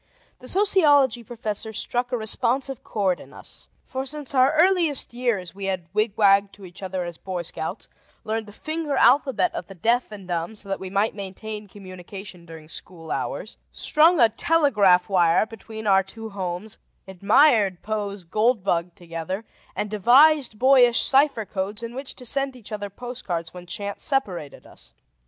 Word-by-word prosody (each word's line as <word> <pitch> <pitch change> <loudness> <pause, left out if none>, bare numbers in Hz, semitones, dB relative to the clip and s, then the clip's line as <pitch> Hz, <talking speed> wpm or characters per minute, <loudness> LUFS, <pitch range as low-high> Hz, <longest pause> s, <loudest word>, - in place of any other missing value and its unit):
The 255 - -11
sociology 290 - +4
professor 220 -2 -5
struck 245 +3 -1
a 250 - 0
responsive 245 +4 -1
chord 195 -4 0
in - - -14
us: - - -10 0.2
for 265 0 -4
since 285 +1 -6
our 260 +1 +5
earliest 330 -5 +2
years 235 -8 -2
we 195 0 -6
had 185 -3 -2
wigwagged 205 -2 +3
to 200 - -13
each 175 +1 -13
other 185 -1 -3
as 170 -1 -8
Boy 185 -2 -4
Scouts, 170 +4 -5 0.4
learned 220 0 -3
the - - -11
finger 310 +5 -3
alphabet 270 +7 +3
of 340 - -5
the 195 - -11
deaf 235 +7 +1
and 200 -3 -10
dumb 175 +4 -3
so 205 -1 -14
that 195 - -2
we 190 - -6
might 200 +3 +1
maintain 210 +2 -7
communication 185 -1 -11
during 160 -1 -11
school 165 0 -8
hours, - - -4
strung 320 +2 +3
a 235 - +7
telegraph 220 - +3
wire 175 -1 +3
between 220 0 -10
our 195 -2 +5
two 220 +3 -9
homes, 190 +2 -5 0.3
admired 200 - +3
Poe's 205 -3 -4
"Gold 215 +5 +1
Bug" 175 -2 -1
together 175 +4 -6 0.3
and 210 - -2
devised 255 +4 +5
boyish 250 -1 +5
cipher 275 -5 +3
codes 200 +3 -4
in 230 0 -6
which 270 +2 -6
to 250 - -10
send 275 +2 -1
each 235 -3 -13
other 205 -1 -4
postcards 200 -7 -5
when 180 -1 -11
chance 200 +2 -5
separated 195 - -2
us. - - -14
215 Hz, 165 wpm, -24 LUFS, 190-255 Hz, 0.4 s, a